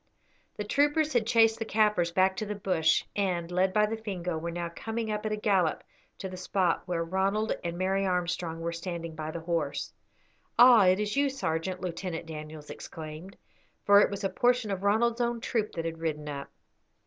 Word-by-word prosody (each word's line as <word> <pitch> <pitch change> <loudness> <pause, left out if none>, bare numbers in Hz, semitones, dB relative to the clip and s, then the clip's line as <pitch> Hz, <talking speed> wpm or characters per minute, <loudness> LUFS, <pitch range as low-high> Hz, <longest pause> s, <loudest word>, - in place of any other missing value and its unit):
The 210 - -2
troopers 295 +7 +2
had 230 -3 +2
chased 225 -1 +4
the - - -1
Kaffirs 210 -6 +2
back 190 +2 +3
to 215 - -2
the 210 - -3
bush, 175 -5 +2
and, 180 -4 -1
led 185 +1 +2
by 210 +2 +3
the 215 +1 -2
Fingo, 185 -6 -4
were 165 +2 -3
now 170 0 -3
coming 225 0 -3
up 210 +1 -2
at - - -3
a - - +1
gallop 195 -6 +1 0.3
to 190 - -5
the 185 -1 -8
spot 185 -1 0
where 170 -2 -1
Ronald 195 +5 0
and 170 0 -3
Mary 190 +2 +1
Armstrong 175 -2 -1
were 170 0 -2
standing 170 -1 -5
by 155 0 -5
the 165 +1 -5
horse. 165 -4 -2 0.6
"Ah, 240 -5 +8
it 185 +2 +4
is 210 0 -1
you, 280 0 +3
sergeant," 185 -8 -2
Lieutenant 175 -1 -4
Daniels 155 -1 -8
exclaimed, 160 +4 -9 0.5
for 205 0 +7
it - - +3
was 200 0 -5
a 195 - +1
portion 245 -2 +1
of 190 -1 -2
Ronald's 230 +4 +2
own 235 0 0
troop 225 -2 -1
that 165 -1 -4
had 165 0 -4
ridden 150 -2 -3
up. 140 -1 -5
185 Hz, 195 wpm, -29 LUFS, 170-215 Hz, 0.6 s, Ah